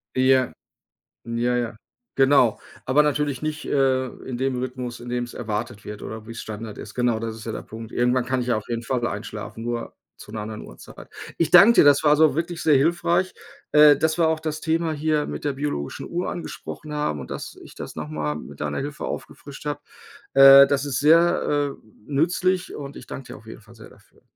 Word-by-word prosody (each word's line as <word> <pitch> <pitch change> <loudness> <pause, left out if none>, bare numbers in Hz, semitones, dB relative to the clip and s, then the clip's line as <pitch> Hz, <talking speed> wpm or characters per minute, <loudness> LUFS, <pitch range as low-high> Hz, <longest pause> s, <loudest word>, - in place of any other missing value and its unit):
Ja. 130 0 +3 0.7
Ja, 120 +1 0
ja, 120 -2 -2 0.4
genau. 135 -4 +4 0.3
Aber 145 +4 +3
natürlich 150 -2 -1
nicht, 155 0 -3
äh, 130 -2 +1 0.2
in 130 - -4
dem 130 -1 -1
Rhythmus, 125 -1 -5
in 120 - -10
dem's 120 0 -3
erwartet 110 -1 -4
wird, 105 0 -8
oder 110 0 -7
wie's 115 0 -7
Standard 110 0 -7
ist. 100 - -9
Genau, 120 -2 +1
das 115 -1 -4
ist 110 - -11
ja 115 - -3
der - - -6
Punkt. 115 0 -10
Irgendwann 125 +1 +1
kann 130 0 0
ich 125 - -4
ja 120 - +2
auf 110 - -6
jeden 115 -1 -3
Fall 120 0 -1
einschlafen, 115 - -6
nur 120 0 -4 0.2
zu 105 - -13
'ner 110 - -4
anderen 110 +1 -6
Uhrzeit. - - -13 0.3
Ich 165 - +1
danke 200 +6 +9
dir. - - +6
Das 145 0 +5
war 150 -1 +5
so 155 -3 +4
wirklich 170 +2 -3
sehr 150 -3 +4
hilfreich, 170 +5 +1 0.4
äh, 150 -1 +7
dass 160 +3 0
wir 165 - +4
auch 160 0 0
das 155 -1 -4
Thema 165 0 0
hier 155 0 0
mit - - -6
der 145 - 0
biologischen 135 - -4
Uhr 175 +1 -3
angesprochen 160 -2 -7
haben 150 - -2
und - - -9
dass - - -7
ich - - -14
das - - -7
noch 75 -1 -6
mal 75 -1 -3
mit 75 -5 -10
deiner 75 -1 -2
Hilfe 145 +1 -5
aufgefrischt 140 0 -7
habe. 145 -1 -3 0.5
Äh, 135 0 +10
das 140 0 0
ist 135 -3 -2
sehr, 150 -2 +3
äh, - - -25 0.2
nützlich. 180 +5 +1
Und 140 -1 -8
ich - - -10
danke 135 - -8
dir - - -8
auf 110 - -18
jeden 110 - -10
Fall 115 +2 -18
sehr 110 - -13
dafür. - - -23
130 Hz, 210 wpm, -23 LUFS, 115-150 Hz, 0.7 s, Äh